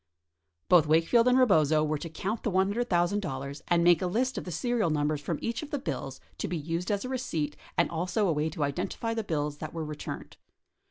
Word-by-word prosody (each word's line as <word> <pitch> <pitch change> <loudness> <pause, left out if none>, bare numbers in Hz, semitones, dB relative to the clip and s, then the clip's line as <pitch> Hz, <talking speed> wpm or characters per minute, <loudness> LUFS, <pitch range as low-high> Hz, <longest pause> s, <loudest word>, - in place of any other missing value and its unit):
Both 170 -4 +6
Wakefield 165 +10 +4
and 250 +1 +5
Rebozo 160 - +4
were 155 -1 -1
to 165 - -6
count 195 +8 -3
the - - -1
$100,000 185 - 0
and 170 -1 +3
make 175 -2 +5
a 185 - 0
list 250 +8 0
of - - -4
the 180 - -5
serial 235 -1 0
numbers 150 -1 0
from 155 +2 -2
each 230 0 -2
of 305 - -7
the 295 - -1
bills 135 - -4 0.2
to - - -1
be 175 - -2
used 165 +4 -3
as 205 +2 0
a - - -3
receipt 165 - -2 0.2
and 170 - +4
also 180 +5 0
a 170 - +2
way 150 +1 0
to 155 -1 -3
identify 185 +10 -2
the 225 -1 -2
bills 150 -5 -2
that 155 +1 -6
were 160 -1 -3
returned. 150 -1 -7
170 Hz, 215 wpm, -29 LUFS, 155-215 Hz, 0.2 s, Both